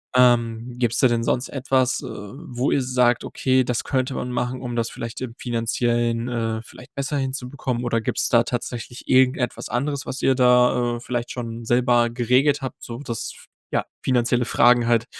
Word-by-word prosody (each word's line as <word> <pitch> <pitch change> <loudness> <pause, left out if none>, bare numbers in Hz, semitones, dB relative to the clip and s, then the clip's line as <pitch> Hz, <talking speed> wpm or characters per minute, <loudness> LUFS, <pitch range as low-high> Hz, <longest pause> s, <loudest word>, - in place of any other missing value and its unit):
Ähm, 120 -1 +3
gibt's 120 -1 0
da 130 - +6
denn 115 -1 0
sonst 125 +2 0
etwas, 130 -2 +1
äh, - - -6
wo 125 +4 -4
ihr 140 - +2
sagt: 125 -1 +2
„Okay, 130 0 +1
das 125 -1 -1
könnte 130 -1 0
man 125 - -3
machen, 125 +1 -2
um 120 -2 -4
das 115 -1 0
vielleicht 115 -1 -6
im 125 -3 -5
Finanziellen, 120 0 0
äh, 115 -2 -2
vielleicht - - -14
besser 140 +1 -2
hinzubekommen?“ 130 -2 -3
Oder 115 -1 0
gibt's - - -1
da 115 -1 +5
tatsächlich 120 0 -5
irgendetwas 130 -1 +2
anderes, 140 +2 -2
was 135 - -5
ihr 135 - +3
da, 125 -1 +3
äh, - - -8
vielleicht 120 -1 -3
schon 115 -2 -6
selber 120 0 +3
geregelt 125 +5 +2
habt, 130 - -6
sodass 120 -1 -5
f - - -16 0.3
ja, - - +1 0.2
finanzielle 125 -1 +2
Fragen 120 0 +4
halt 115 -1 +3
125 Hz, 180 wpm, -23 LUFS, 120-130 Hz, 0.3 s, da